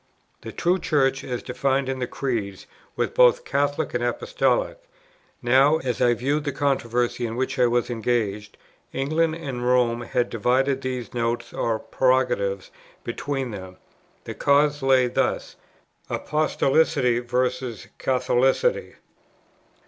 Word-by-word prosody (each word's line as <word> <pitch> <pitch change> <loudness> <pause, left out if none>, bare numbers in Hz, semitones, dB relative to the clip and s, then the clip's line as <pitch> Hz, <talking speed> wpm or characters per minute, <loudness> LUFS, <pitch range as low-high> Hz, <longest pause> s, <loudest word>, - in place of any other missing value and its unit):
The - - -7
true 180 +2 +1
Church, 135 -4 +1
as 125 -2 -4
defined 135 +1 0
in 135 0 -3
the 125 - -2
Creeds, 110 -8 -3 0.3
was - - -1
both - - +4
Catholic 145 +1 -1
and 120 0 -1
Apostolic; - - 0 0.6
now, 135 +5 +5
as 130 -6 -3
I 120 -1 +4
viewed 140 +5 -1
the 145 - 0
controversy 125 -4 -1
in 115 - -5
which 130 +1 -2
I 125 - +5
was 120 0 +1
engaged, 105 -3 -2 0.4
England 155 +4 0
and 135 -7 -5
Rome 125 -1 +2
had 120 0 -1
divided 130 +4 +1
these 130 -2 -4
notes 120 0 -2
or 115 -1 0
prerogatives 120 -7 0 0.3
between 135 +1 -3
them: 95 -2 -9 0.5
the - - -6
cause 145 +1 +2
lay 135 -1 +4
thus, 120 - -1 0.5
Apostolicity 150 -4 +1
versus 125 -2 -2
Catholicity. 130 - +1
130 Hz, 125 wpm, -24 LUFS, 120-140 Hz, 0.6 s, now